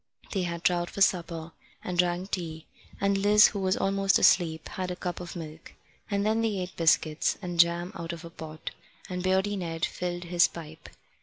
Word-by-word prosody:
They 195 - 0
had 170 -1 -3
trout 175 -1 +2
for - - -8
supper, 170 -3 +1 0.3
and 180 - -3
drank 180 +2 +1
tea, 160 -3 -4 0.3
and 200 0 +2
Liz, 210 +1 +6
who 200 - -5
was 190 -1 +1
almost 195 0 +2
asleep, 160 -3 +3
had 185 -1 -4
a 180 - -3
cup 180 0 -4
of 175 0 -7
milk; 160 -1 -9 0.3
and 200 -1 0
then 220 +1 +2
they 220 -3 0
ate 185 0 -5
biscuits, 160 -1 +2
and 175 -3 -5
jam 170 +1 +3
out 170 0 -5
of 170 -1 -8
a 165 - -9
pot, 155 -1 -8 0.4
and 180 -1 -3
Beardy 190 +2 +1
Ned 165 -3 -2
filled 175 0 -4
his 175 0 +4
pipe. 160 -1 -10
175 Hz, 190 wpm, -28 LUFS, 170-190 Hz, 0.4 s, Liz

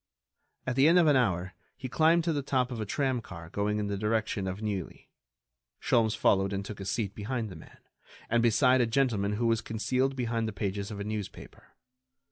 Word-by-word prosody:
At 130 - -1
the 135 +3 +5
end 170 +2 +6
of 175 - +5
an 150 -2 +5
hour 95 -7 +1 0.2
he 130 - -5
climbed 165 +5 +3
to 165 -1 0
the 145 - -1
top 130 -2 0
of 115 -3 -4
a 105 - -4
tramcar 110 - -3
going 105 +1 -1
in 105 - -1
the 100 -1 -3
direction 105 -2 -1
of 95 +1 -4
Neuilly. 105 -5 -5 0.7
Sholmes 110 -2 +2
followed 95 0 +2
and 100 0 -3
took 105 0 -8
a 95 - -6
seat 100 -1 -2
behind 110 +2 -3
the 95 - -9
man, 80 - -14 0.5
and 115 +1 +2
beside 125 +3 +4
a 120 - +2
gentleman 115 -5 +1
who 115 +3 -1
was 115 -1 +2
concealed 130 +4 -1
behind 115 -3 -1
the 110 - -4
pages 100 0 -3
of 105 -2 -6
a - - -3
newspaper. 105 -1 -7
110 Hz, 205 wpm, -29 LUFS, 100-130 Hz, 0.7 s, end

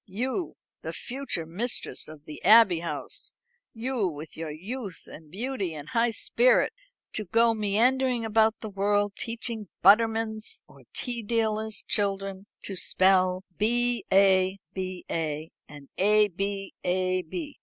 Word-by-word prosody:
You, 255 - -3 0.3
the - - -5
future 250 -10 -4
mistress 210 +10 -2
of 155 -1 -12
the 150 - -10
Abbey 210 -5 +7
House 165 -4 -3 0.4
you, 235 -2 -1
with 155 -1 -7
your 160 -1 -5
youth 195 - -6
and 155 -1 -13
beauty 200 - -3
and 150 0 -8
high 235 +1 +2
spirit 235 +2 +3 0.4
to 215 - -2
go 230 +5 +4
meandering 235 +4 +2
about 220 0 +3
the 220 - -5
world 205 +1 +1
teaching 230 -2 -4 0.2
buttermen's 220 +2 +3
or - - -19
tea 240 -2 -4
dealers' 220 -1 -1
children 195 -1 -1 0.2
to 195 - -4
spell 185 0 +3 0.2
B 240 +1 +1
a, 190 -1 +4 0.2
ba, 185 -1 -5 0.7
and 145 -1 -12
A 210 +2 +5
b, 195 +1 -4
ab?" 185 -1 -1
205 Hz, 130 wpm, -27 LUFS, 185-230 Hz, 0.7 s, Abbey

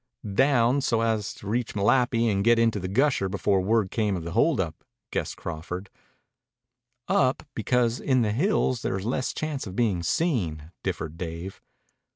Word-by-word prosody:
"Down, 130 +2 +3
so 115 -4 +1
as 110 -3 0
to 100 - -11
reach 115 +2 -1
Malapi 115 +3 +3
and 100 -3 +1
get 120 +1 +5
into 115 -2 +2
the 95 - -4
Gusher 120 -1 +2
before 95 0 +1
word 105 0 +1
came 105 -3 0
of 85 - -6
the 85 - -5
hold 145 - +2
up," 80 -4 -3 0.3
guessed - - -3
Crawford. 90 +3 -6 1.2
"Up, 130 -1 +2
because 120 +1 +1
in 130 -3 +2
the 105 - +1
hills 130 - +1
there's 95 +1 -2
less 130 +2 -1
chance 150 -6 -4
of 95 - -7
being 105 -7 +1
seen," 85 - -1
differed 80 +2 -4
Dave. 85 +2 -6
110 Hz, 165 wpm, -26 LUFS, 95-125 Hz, 1.2 s, get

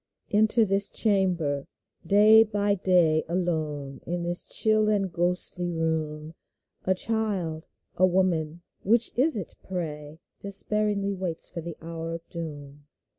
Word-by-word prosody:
Enter 220 +2 +3
this 195 0 +1
chamber. 180 -9 +1 0.4
Day 215 +2 +6
by 205 -2 0
day. 175 -5 +3
Alone 155 -6 -2
in 175 0 -2
this 175 +1 -1
chill 215 -1 +3
and 195 -4 0
ghostly 175 0 -1
room, 160 -2 -2 0.5
A 190 - +2
child 190 -7 -2
— - - -47
a - - +8
woman 175 -3 0
— - - -50
which 230 +3 +3
is 260 +1 +3
it, 190 - -7
pray? 155 -4 -6
— - - -52
Despairingly 200 0 -1
waits 180 -4 -3
for 170 - -6
the 170 0 -7
hour 165 0 -5
of 165 - -10
doom 145 -3 -8
175 Hz, 140 wpm, -26 LUFS, 160-200 Hz, 0.5 s, a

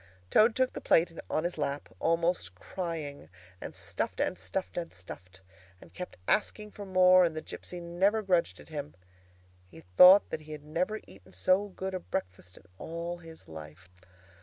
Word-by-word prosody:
Toad 220 +1 +5
took 260 0 +1
the - - -6
plate 165 0 +3
on 155 - 0
his 175 -2 -3
lap, 145 -1 -2
almost 165 - +1
crying, 155 - -5 0.3
and - - -7
stuffed, - - -3
and - - +1
stuffed, 190 - -4
and 170 -1 -4
stuffed, 90 +1 -11 0.4
and - - -16
kept 180 - -7
asking 210 0 0
for 205 -1 -9
more, 185 -1 +6
and 165 -2 0
the - - -2
gipsy 180 - -7
never 190 +6 +1
grudged 175 - +1
it 75 - -14
him. 75 +2 -6 0.7
He - - -13 0.2
thought 190 +3 +9
that 155 - -3
he 155 0 -9
had 150 -1 -8
never 175 +8 -2
eaten 95 0 -17
so 185 - +2
good 190 0 -5
a 185 - -2
breakfast 90 - -5
in - - -17
all 170 +1 -5
his 165 -1 -13
life. 80 +3 -11
170 Hz, 175 wpm, -30 LUFS, -, 0.7 s, thought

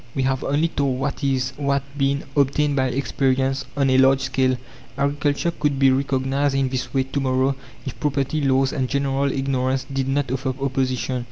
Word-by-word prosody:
We 135 - 0
have 130 0 0
only 150 +4 +1
told 135 -5 -1
what 140 +2 -3
is, 130 -1 0
what 140 -1 0
been, 140 0 0
obtained 145 +1 +2
by 130 -1 +2
experience 135 +1 0
on 135 -2 +3
a 130 - +4
large 135 0 +5
scale. 130 -1 +1 0.4
Agriculture 145 +3 0
could 150 -4 -1
be 135 -1 +5
reorganized 135 +1 0
in 135 -1 +1
this 125 -1 -3
way 135 -1 +1
to 135 +2 -3
morrow 130 0 +1 0.3
if 130 -3 -6
property 145 +1 0
laws 135 -1 +2
and 130 -3 -1
general 140 0 0
ignorance 135 -1 0
did 135 -1 -1
not 135 -1 0
offer 130 0 -2
opposition. 130 -2 -1
135 Hz, 180 wpm, -22 LUFS, 130-140 Hz, 0.4 s, large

